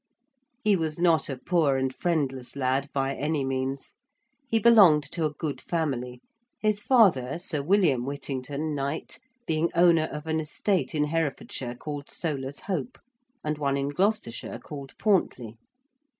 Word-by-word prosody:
He 210 -2 +4
was 160 -3 -2
not 165 -5 +3
a 135 - -3
poor 145 -1 +2
and 130 0 -1
friendless 135 -7 -2
lad 135 +1 0
by 135 0 0
any 150 0 -1
means. 135 +1 -3 0.5
He 225 - +2
belonged 200 -10 +7
to 165 -2 -1
a 150 - -1
good 150 0 -4
family, 125 -7 -2 0.4
his 215 -1 +1
father, 170 - +4
Sir 170 -4 -2
William 155 -6 +3
Whittington, 140 +2 -3
Knight, 140 +2 -4 0.3
being 160 +1 +1
owner 170 -2 +5
of 150 +1 -6
an 160 0 0
estate 160 0 -1
in 150 - +2
Herefordshire 145 -5 -2
called 145 +2 -6
Soler's 140 -4 -4
Hope, 205 +5 -3 0.5
and 150 0 -2
one 140 -1 +1
in 140 0 -1
Gloucestershire 185 - -1
called 140 +2 -10
Pauntley. 125 - 0
150 Hz, 145 wpm, -27 LUFS, 135-170 Hz, 0.5 s, belonged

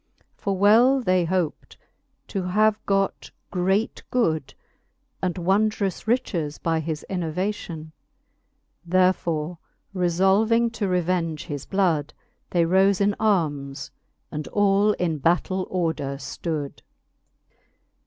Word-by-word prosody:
For 195 -1 -2
well 230 +7 +5
they 185 -7 +2
hoped 175 -3 -2 0.5
to 195 - -2
have 210 +4 +2
got 195 0 0 0.2
great 190 +4 0
good 160 - +1
j - - -18 0.7
And 185 -2 -1
wondrous 200 +3 0
riches 170 - -1
by 165 -1 0
his 160 -1 -4
innovation. 175 -2 -3 0.9
Therefore 175 -2 +1 0.4
refblving 195 +6 +2
to 215 -3 -2
revenge 175 -3 -1
his 145 -2 -6
blood, 165 -7 0 0.3
They 170 -2 +2
role 190 +3 +4
in 200 0 +2
armes, 150 -10 0 0.4
and 150 0 -5
all 205 +1 +3
in 165 -6 -1
battell 180 +5 +1
order 160 -6 -1
ftood. 145 +1 -5
185 Hz, 105 wpm, -24 LUFS, 160-200 Hz, 0.9 s, well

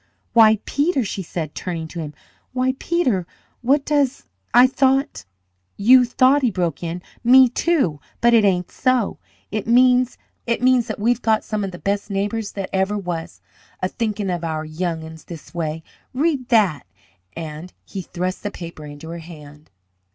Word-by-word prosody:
"Why, 220 -2 +7
Peter!" 285 -2 +1
she 195 - -4
said, 160 -3 -5
turning 165 -3 -4
to 170 - -7
him. 150 -2 -6 0.4
"Why, 255 0 +1
Peter! 250 - 0 0.3
What 275 +4 +2
does 280 -3 +1 0.3
I 245 +1 +7
thought 265 - +1 0.3
" 90 0 -48
"You 250 +5 +6
thought!" 260 +4 +3
he 250 - +3
broke 175 -6 -2
in. 175 +1 -5 0.2
"Me, 255 +2 +7
too. 245 - 0 0.2
But 235 0 +4
it 225 -2 +6
ain't 180 -3 +1
so. 255 -5 0 0.3
It 215 0 -3
means 250 +1 +4 0.3
that 240 -1 +2
we've 235 +3 +1
got 220 -1 +2
some 215 -2 -3
of 195 - -2
the 175 - -9
best 200 +2 -2
neighbours 205 +2 -2
that 195 -2 -5
ever 190 +2 +1
was, 175 -4 -5 0.4
a 185 - 0
thinkin' 210 -2 -2
of 175 -1 -3
our 160 -1 -3
young 160 +1 -3
'uns 160 0 -11
this 170 -1 -11
way! 160 -1 -3 0.3
Read 275 -3 0
that!" 200 - +2 0.5
and 160 +2 -7
he 195 - -6
thrust 180 +1 -4
the 205 - -3
paper 170 -5 -9
into 145 +2 -10
her 170 +1 -6
hand. 150 -2 -13
200 Hz, 165 wpm, -21 LUFS, 170-250 Hz, 0.5 s, Why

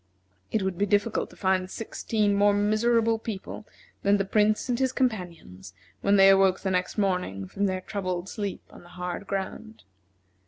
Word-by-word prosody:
It 215 - 0
would 190 -2 -2
be 205 - +2
difficult 205 +3 +1
to - - -16
find 185 -1 0
sixteen 215 -1 -1
more 205 0 +4
miserable 225 +2 +2
people 215 -1 -7 0.3
than 200 +1 +3
the 195 - -1
Prince 210 +3 +2
and 245 -1 -1
his 260 -1 +1
companions 170 - -3 0.3
when 200 - +3
they 195 -1 +7
awoke 195 -1 +4
the 190 - -1
next 180 +2 -1
morning 180 - -1
from 200 - -1
their 185 -1 -2
troubled 185 -2 -4
sleep 200 -1 -5
on - - -14
the 175 - -17
hard 180 +2 -5
ground. 200 +3 -5
200 Hz, 170 wpm, -26 LUFS, 185-215 Hz, 0.3 s, they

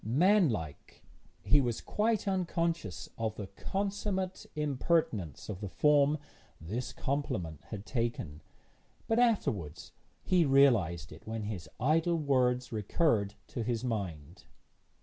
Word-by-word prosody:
Manlike, 130 - +1 0.4
he 145 0 +5
was 120 -3 -1
quite 215 -1 0
unconscious 170 - -1
of 110 -1 -1
the 105 - -5
consummate 190 - -3
impertinence 140 - 0
of 100 -2 -6
the 100 - -4
form 150 +4 +4 0.4
this 110 +11 -4
compliment 130 - -3
had 105 -2 -7
taken; 115 - -3 0.7
but 225 +1 +2
afterwards 110 - 0 0.3
he 180 -2 +4
realised 115 - +3
it 80 - -13
when 110 -1 -3
his 105 -5 -5
idle 165 +5 +2
words 125 -4 +1
recurred 105 - +1
to 120 - -4
his 115 0 -1
mind. 90 - -4
125 Hz, 115 wpm, -31 LUFS, 100-165 Hz, 0.7 s, he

